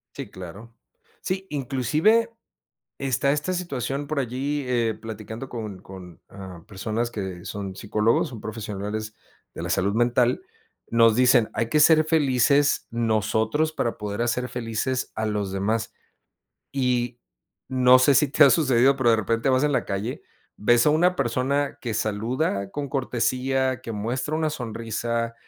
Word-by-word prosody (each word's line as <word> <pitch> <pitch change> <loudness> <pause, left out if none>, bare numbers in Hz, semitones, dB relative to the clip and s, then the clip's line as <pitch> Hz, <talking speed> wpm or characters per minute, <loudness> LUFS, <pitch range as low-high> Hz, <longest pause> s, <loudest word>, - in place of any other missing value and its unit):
Sí, 135 -7 -7
claro. 95 +6 -10 0.5
Sí, 190 +1 -3
inclusive 150 - +1 0.7
está 135 +1 0
esta 150 +5 -1
situación 140 -5 -3
por 155 -1 -1
allí, 135 +3 -2
eh, 115 -3 +1
platicando 110 +3 -7
con 105 -6 -6
con, 90 -3 -12
em, 95 -4 -10
personas 110 +4 -3
que 95 -2 -6
son 100 -2 -5
psicólogos, 110 +4 +1
son 115 -5 -9
profesionales 110 0 -5 0.4
de - - -7
la - - -4
salud 100 +2 +1
mental. 120 +1 +2 0.5
Nos 115 -1 +5
dicen: 125 -2 +4
"Hay 115 - -1
que 150 - +2
ser 155 +1 +6
felices 140 -2 +2
nosotros 110 +6 0
para 120 -6 -2
poder 105 +1 -4
hacer 125 +1 -1
felices 125 +2 -2
a 110 - -2
los 105 -3 -2
demás". 110 +4 -1 0.8
Y 125 -3 0 0.5
no 130 -1 +6
sé 135 +2 +4
si 150 +2 +4
te 150 +3 +6
ha 140 - +7
sucedido, 135 -3 +4
pero 130 -3 +3
de 115 - +5
repente 115 +4 0
vas 130 +2 +3
en 150 - +2
la - - +1
calle, 100 +5 -4 0.3
ves 120 +5 +3
a - - +6
una 180 +4 +3
persona 135 +2 0
que 115 -3 -4
saluda 110 0 -1
con 145 +3 -4
cortesía, 130 0 0
que 115 - -6
muestra 125 +8 -2
una 155 -1 0
sonrisa, 115 -2 -3
120 Hz, 150 wpm, -24 LUFS, 110-135 Hz, 0.8 s, ha